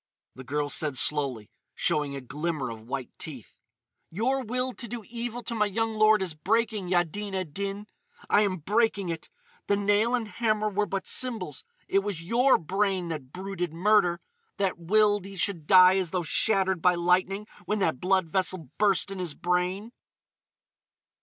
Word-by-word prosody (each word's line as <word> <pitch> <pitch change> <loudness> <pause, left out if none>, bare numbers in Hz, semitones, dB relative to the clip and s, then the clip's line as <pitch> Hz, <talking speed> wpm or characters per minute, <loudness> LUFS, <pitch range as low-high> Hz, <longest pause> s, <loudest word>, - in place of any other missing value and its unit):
The 130 - -10
girl 145 +3 -2
said 145 -1 0
slowly, 135 -7 +1 0.2
showing 145 -2 0
a 140 - -5
glimmer 145 0 -3
of 110 -1 -9
white 130 -1 -4
teeth: 135 -9 -9 0.5
"Your 255 +9 0
will 250 +2 -2
to 240 - -6
do 235 0 -6
evil 240 0 -5
to 235 - -4
my 210 -2 +1
young 225 +2 -1
lord 215 -2 +4
is 180 -4 -3
breaking, 210 +3 0
Yaddin 190 +3 -1
ed 185 -6 -4
Din.... 200 +1 -4 0.4
I 205 - +4
am 195 -3 +1
breaking 205 +2 0
it. 165 -1 -5 0.4
The 200 - +3
nail 205 +4 +2
and 235 -3 -3
hammer 215 -1 0
were 210 +1 0
but 195 -1 -3
symbols. 220 - 0 0.2
It 195 - +3
was 195 -4 -4
your 245 +8 +4
brain 190 +1 -1
that 145 -5 -6
brooded 185 -2 -4
murder—that 200 - 0
willed 205 +2 +3
he 195 0 -9
should 175 -5 -1
die 185 0 +7
as 185 -3 -2
though 180 0 -1
shattered 190 0 +2
by 180 +1 +4
lightning 185 +4 +1 0.2
when 210 - 0
that 165 -9 0
blood 190 0 +2
vessel 180 -4 -2
burst 200 -2 +2
in 195 - -6
his 175 -5 -3
brain!" 180 +5 -1
190 Hz, 165 wpm, -27 LUFS, 170-210 Hz, 0.5 s, die